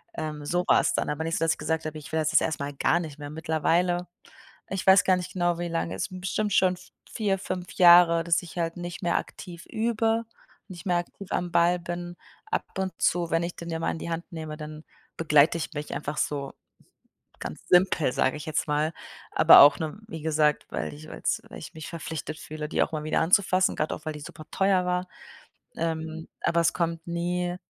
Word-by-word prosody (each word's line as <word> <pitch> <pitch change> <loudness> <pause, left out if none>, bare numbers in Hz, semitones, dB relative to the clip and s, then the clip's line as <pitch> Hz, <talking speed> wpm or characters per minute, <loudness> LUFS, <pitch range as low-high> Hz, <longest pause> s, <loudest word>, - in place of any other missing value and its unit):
Ähm, 150 -1 -5
so 175 +4 0
war - - +6
es - - 0
dann. - - -1
Aber 150 +2 -2
nicht 165 +1 -1
so, 165 - -1
dass 165 - +3
ich - - -11
gesagt 160 0 -2
habe: 155 0 -4
„Ich 150 - -10
will 160 - 0
das 155 - 0
jetzt - - +5
erstmal 145 -3 -2
gar 170 +5 +2
nicht 155 -3 -7
mehr.“ 145 0 -6
Mittlerweile 170 +3 0 0.6
ich 190 0 -4
weiß 190 +1 +7
gar 185 -1 +3
nicht 180 - -6
genau, 175 -2 0
wie 175 - -2
lange, 165 0 -2
es - - -2
sind 185 -1 -9
bestimmt 205 +2 -1
schon 185 -1 +3 0.3
4, 205 -4 0
5 185 -1 -5
Jahre, 175 -2 +7
dass 170 +2 +2
ich 175 0 -11
halt 165 0 -2
nicht 175 +1 -6
mehr 170 - +2
aktiv 175 0 -7
übe, 225 0 0 0.5
nicht 175 -1 -10
mehr 175 -2 +2
aktiv 180 +2 -6
am 175 -1 -1
Ball 175 +1 +3
bin, 175 +1 -6 0.3
ab - - 0 0.2
und 190 -1 -1
zu, 170 -1 +2
wenn 165 +1 +1
ich 175 - -4
dann 170 0 -7
ja 165 - -2
mal - - 0
in 160 - -6
die - - -5
Hand 170 +3 -5
nehme, 155 -2 -6
dann 155 0 -8 0.3
begleite 150 0 +4
ich 160 +1 -5
mich 150 0 -5
einfach 150 0 -4
so 140 -2 -2 0.9
ganz 75 - -7
simpel, 180 -6 +4
sage 130 - +1
ich 150 - -8
jetzt 155 0 -1
mal. 150 +2 +1 0.4
Aber - - +9
auch 145 0 +7
nur, 160 +5 -4
wie 160 -8 -7
gesagt, 150 -1 +1
weil 75 -1 -4
ich 75 +1 -11
weil - - -9
es - - 0
weil - - -9
ich - - -10
mich 160 -1 -8
verpflichtet 160 -2 -6
fühle, 155 -1 -6
die - - +2
auch - - -5
mal 155 -1 -3
wieder 155 - +1
anzufassen, 185 +2 +3
gerade 155 - -1
auch, 155 - -14
weil 155 - -3
die 150 - -8
super 155 +1 -10
teuer 190 -2 +2
war. 180 0 -1 0.7
Ähm, 160 0 -3
aber 170 0 +2
es 165 - +3
kommt 165 -1 -2
nie 175 +1 -2
170 Hz, 225 wpm, -26 LUFS, 155-180 Hz, 0.9 s, Aber